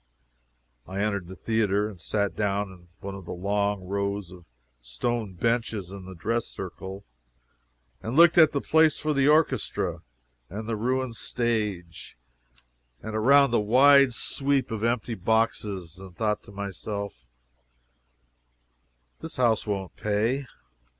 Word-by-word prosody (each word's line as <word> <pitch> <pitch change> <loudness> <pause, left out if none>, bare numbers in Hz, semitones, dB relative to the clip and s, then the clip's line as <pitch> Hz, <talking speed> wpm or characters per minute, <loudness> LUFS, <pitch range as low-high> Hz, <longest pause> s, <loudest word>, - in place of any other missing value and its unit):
I 95 +1 -5
entered 100 -4 -1
the 95 - -9
theatre, 105 -2 +1
and 100 -6 -10
sat 100 0 -1
down 100 -1 -1
in 90 -2 -16
one 100 0 -5
of 95 -2 -9
the - - -5
long 100 +2 -1
rows 100 0 -3
of 90 -2 -13 0.4
stone 95 - -3
benches 110 -2 -1
in 100 -2 -9
the 95 0 -9
dress 115 +7 -1
circle, 95 +1 -7 1.0
and 115 +3 -4
looked 170 +1 +7
at 155 -2 +7
the 140 - -1
place 160 -1 +4
for 155 0 -1
the 140 -1 +3
orchestra, 110 - +1 0.5
and 105 +4 -6
the 115 - -1
ruined 125 +1 -1
stage, 105 - -3 0.9
and 110 - -5
around 140 +5 +5
at - - -8
the 120 - +3
wide 135 +3 +6
sweep 140 -1 0
of 110 -1 -3
empty 115 0 0
boxes, 100 -4 -1
and 95 -2 -12
thought 105 -2 0
to - - -13
myself, 100 - -5 2.0
"This 160 - -7
house 115 -4 +2
won't 100 -3 -3
pay." 115 +6 0
105 Hz, 140 wpm, -26 LUFS, 95-120 Hz, 2.0 s, looked